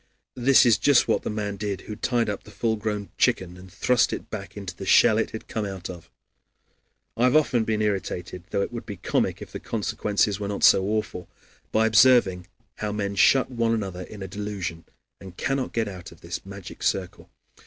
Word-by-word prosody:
This 130 +2 +6
is 115 -5 +4
just 140 +5 +4
what - - +2
the - - -4
man 105 -2 -3
did 100 -1 -3
who 105 - -7
tied 120 +1 0
up 100 -2 -3
the - - -16
full 115 -1 -1
grown 105 -1 -3
chicken 90 -1 +1
and 90 0 -13
thrust 125 +6 +2
it - - -6
back 100 -1 -7
into 95 -3 -6
the 95 - -8
shell 110 +3 +6
it 110 - 0
had 110 - -8
come 110 - -3
out 95 -3 -5
of. 85 -2 -12 1.1
I 120 - +2
have 125 - +3
often 125 -7 +3
been 110 -1 0
irritated, 90 -3 -3
though 100 - 0
it - - -6
would 115 0 -6
be 100 - -6
comic - - -1
if - - -13
the - - -6
consequences 105 -2 -1
were 100 - -3
not 100 0 -4
so 95 - +7
awful, 105 -4 -3 0.4
by 110 +1 +3
observing 105 -5 +4 0.3
how 105 -1 -3
men 100 -1 -2
shut 130 +7 +4
one 115 -2 +1
another 95 -4 -4
in 100 +2 -8
a - - -5
delusion 95 -4 -5 0.3
and 95 -1 -12
cannot 135 -3 -1
get 115 -2 -1
out 90 -3 -8
of 85 - -17
this 85 +1 -6
magic 100 -1 -10
circle. 90 -2 -2
105 Hz, 205 wpm, -25 LUFS, 95-110 Hz, 1.1 s, so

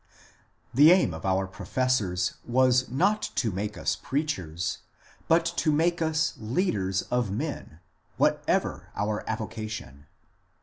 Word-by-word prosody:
The 145 +5 +7
aim 180 - +4
of 80 +4 -5
our 95 +1 +2
professors 100 -3 -1
was 130 +1 +3
not 200 - +2
to 115 - +1
make 105 +3 -4
us - - 0
preachers, 95 - -3 0.5
but 165 +1 +4
to 155 - +2
make 170 +3 +1
us 160 -1 +1
leaders 105 - 0
of 125 -3 +1
men, 105 - -5 0.4
whatever - - +1
our 105 +1 -1
avocation. 110 - -5
115 Hz, 120 wpm, -27 LUFS, 95-150 Hz, 0.5 s, The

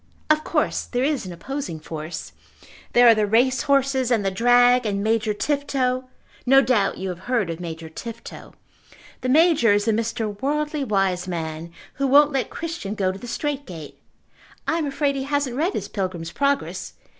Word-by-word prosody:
"Of 310 0 +3
course - - 0
there 245 0 -2
is 280 -8 0
an - - -6
opposing 185 - -5
force. 155 +1 -7 0.6
There 245 0 +7
are 230 - +9
the 215 -1 +1
race 250 +5 +3
horses, 270 -2 +2
and 225 -5 +1
the 195 - +1
drag, 245 +4 +4
and 200 -2 -1
Major 220 0 +1
Tifto. 260 +1 -1 0.4
No 270 +2 +6
doubt 220 -5 +1
you 190 0 -4
have 180 -1 -5
heard 225 -9 +1
of 165 - -6
Major 165 -2 -6
Tifto. 230 +8 -9 0.7
The 255 - -2
Major 295 -6 +5
is 205 0 +1
the 225 - +3
Mr. 220 -1 -2
Worldly 300 +1 -1
Wiseman 180 -6 -2 0.2
who 275 -1 -1
won't 290 +2 +6
let 265 -2 -1
Christian 325 -12 -5
go 190 -3 0
to 190 - -9
the 245 - -9
Strait 285 +2 -3
Gate. 160 -4 -9 0.7
I 330 - +1
am 305 - -1
afraid 280 0 0
he 265 - -3
hasn't 285 -3 -1
read 330 +8 0
his - - -3
Pilgrim's 185 -4 -4
Progress. 280 +4 -1
240 Hz, 180 wpm, -23 LUFS, 195-275 Hz, 0.7 s, are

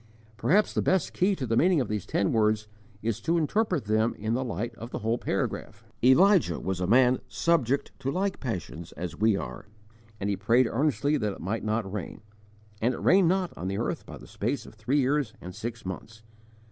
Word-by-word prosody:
Perhaps 195 - +2
the - - +1
best 190 -4 +1
key 195 +2 +2
to 135 - -3
the 115 -1 0
meaning 175 +5 +4
of 130 - 0
these 105 -3 -3
ten 100 - +1
words 110 -1 +2 0.4
is 115 -2 -1
to 170 +1 +1
interpret 180 - 0
them 110 +2 +1
in 110 +2 -2
the 130 +2 0
light 115 0 -3
of 115 +1 -9
the - - -4
whole 115 +2 +1
paragraph: - - -3 0.2
"Elijah 145 - +5
was 95 -1 -3
a 90 - 0
man 125 +3 +5
subject 140 -6 +1
to 135 0 -2
like 190 +6 -1
passions 90 - -5
as 90 -1 -5
we 110 -1 +3
are, 65 -8 -7 0.5
and 100 - -2
he 100 - +1
prayed 115 +7 +3
earnestly 140 +3 +1
that 105 -6 -1
it - - -11
might 100 +7 -3
not 110 -2 -1
rain; 105 -2 -5 0.6
and 120 +3 +2
it - - -7
rained 185 -2 +5
not 185 0 0
on 90 - -5
the 95 +1 -2
earth - - -2
by - - -8
the - - -13
space 125 +6 -3
of - - -12
three 110 +6 -1
years 135 -3 +1
and 90 +1 -8
six 115 +3 -6
months. 110 +4 -7
115 Hz, 210 wpm, -27 LUFS, 105-145 Hz, 0.6 s, Elijah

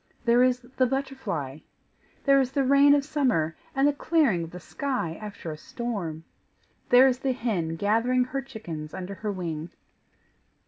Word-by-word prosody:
There 235 +1 +5
is 250 0 +3 0.2
the 255 - +4
butterfly! 235 - -3 0.6
There 275 -1 +5
is 260 0 -2
the 275 - +2
rain 280 +2 +6
of 280 -1 0
summer, 250 - +1 0.2
and 270 +1 +4
the 290 - +3
clearing 280 - +2
of - - -10
the 180 - -9
sky 250 -5 -3
after 200 -6 -7
a 155 - -7
storm! 180 -7 -5 0.7
There 250 +2 +8
is 255 -1 +1
the 265 -1 0
hen 190 -10 -2
gathering 230 +7 +2
her 270 +2 -3
chickens 175 - -8
under 190 +1 -5
her 210 +1 -4
wing! 170 -4 -4
240 Hz, 165 wpm, -26 LUFS, 170-270 Hz, 0.7 s, There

